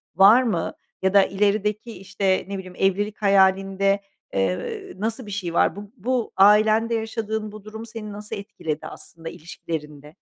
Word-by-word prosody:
var 205 +7 +7
mı? 205 -9 -1 0.3
Ya 190 0 +1
da 200 -1 +7
ilerideki, 210 +3 0
işte, 195 -1 -1
ne 195 0 -4
bileyim 185 -1 -9
evlilik 200 +2 +1
hayalinde, 195 0 +3 0.4
ııı, 95 - -2
nasıl 225 +3 -2
bir 205 - -8
şey 185 -4 -3
var? 170 - +3
Bu 205 0 -9
bu 245 +2 -1
ailende 215 +3 +5
yaşadığın 220 -1 -3
bu 215 -1 -11
durum 220 +2 -8
seni 220 -2 -7
nasıl 210 +1 -5
etkiledi 165 -7 -5
aslında 165 -1 -8
ilişkilerinde? 150 -2 -7
200 Hz, 150 wpm, -23 LUFS, 190-215 Hz, 0.4 s, var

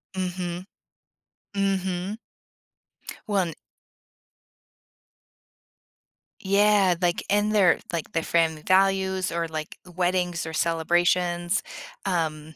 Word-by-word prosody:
Mhm. 180 -1 -3 0.9
Mhm. 195 0 -1 1.1
Wan 190 -6 0 2.9
Yeah, 200 -2 +4
like, 175 -1 +1
in 205 +1 +2
their 200 -4 +4
like, 170 -2 -4
their 165 - 0
family 160 -2 +1
values 190 0 +2
or, 170 0 -1
like, 155 -1 -6 0.2
weddings 180 -2 0
or 160 - -6
celebrations. 175 +2 +1 0.4
Um, 160 -4 -2
180 Hz, 80 wpm, -25 LUFS, 170-190 Hz, 2.9 s, Yeah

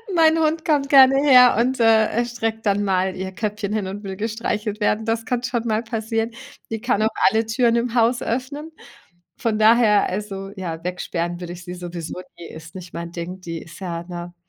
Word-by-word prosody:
Mein 325 -1 +5
Hund 320 +1 0
kommt 290 -4 +1
gerne 270 -1 +7
her 250 -4 +7
und, 255 +2 +1
äh, 225 +1 +3
streckt 225 -2 -3
dann 205 0 +2
mal 190 -1 0
ihr 190 0 -5
Köpfchen 205 +1 -3
hin 210 -3 -1
und 200 +2 -7
will 190 -1 -6
gestreichelt 215 -1 -3
werden. 215 +1 +1
Das 225 0 -1
kann 245 0 -1
schon 240 -2 -2
mal 220 0 0
passieren. 225 0 -2 0.4
Die 225 -1 -4
kann 240 -3 +1
auch 215 - +3 0.2
alle 225 +1 0
Türen 235 +1 +2
im 235 0 -2
Haus 235 +1 +3
öffnen. 285 +6 -4 0.7
Von 225 -2 -1
daher 215 -1 +5
also, 195 0 -5
ja, 165 -3 -5
weg 180 0 -4
sperren 175 0 -3
würde 175 -1 -6
ich 175 0 -10
sie 180 - -7
sowieso 175 -1 -6 0.2
nie, 170 -1 -9
ist 165 +2 -12
nicht 180 -2 -9
mein 170 0 -6
Ding. 175 +2 -6
Die 165 -2 -5
ist 165 - -13
ja, 170 -3 -4
ne, 175 0 -8
215 Hz, 205 wpm, -22 LUFS, 185-235 Hz, 0.7 s, gerne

